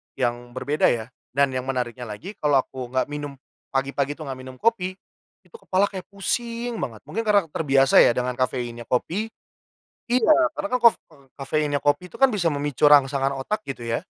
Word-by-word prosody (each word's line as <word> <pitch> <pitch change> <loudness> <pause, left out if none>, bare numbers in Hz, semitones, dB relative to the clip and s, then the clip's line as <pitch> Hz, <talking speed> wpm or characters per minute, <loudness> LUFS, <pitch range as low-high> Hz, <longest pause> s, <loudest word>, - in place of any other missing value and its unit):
yang 120 0 -2
berbeda 140 +4 +1
ya. 115 +1 -1 0.2
Dan 140 -1 +3
yang 130 0 -4
menariknya 125 -2 -3
lagi, 110 - -7
kalau 145 -3 +3
aku 130 -2 -7
nggak 130 +3 -1
minum 145 -1 -5 0.4
pagi-pagi 140 +1 0
itu 155 - -8
nggak 135 -3 -6
minum 130 0 -10
kopi, 185 - 0 0.5
itu - - -19
kepala 190 +1 +1
kayak 190 -3 -7
pusing 235 +3 -3
banget. 115 -6 -5
Mungkin 225 +2 -4
karena 205 -2 +5
terbiasa 135 -3 +4
ya 120 - +6
dengan 125 0 -1
kafeinnya 120 -2 -2
kopi 180 - -1 0.8
iya 250 +5 +4 0.2
karena 300 - -4
kan - - -2
kof 230 -4 +8
eee, 140 -2 -23
kafeinnya 145 +1 -1
kopi 175 +6 0
itu - - -12
kan 270 - +7
bisa 185 -9 0
memicu 145 -1 -2
rangsangan 140 -2 +5
otak 210 +11 -3
gitu 130 -4 -6
ya. 115 +9 -2
140 Hz, 180 wpm, -24 LUFS, 130-185 Hz, 0.8 s, kof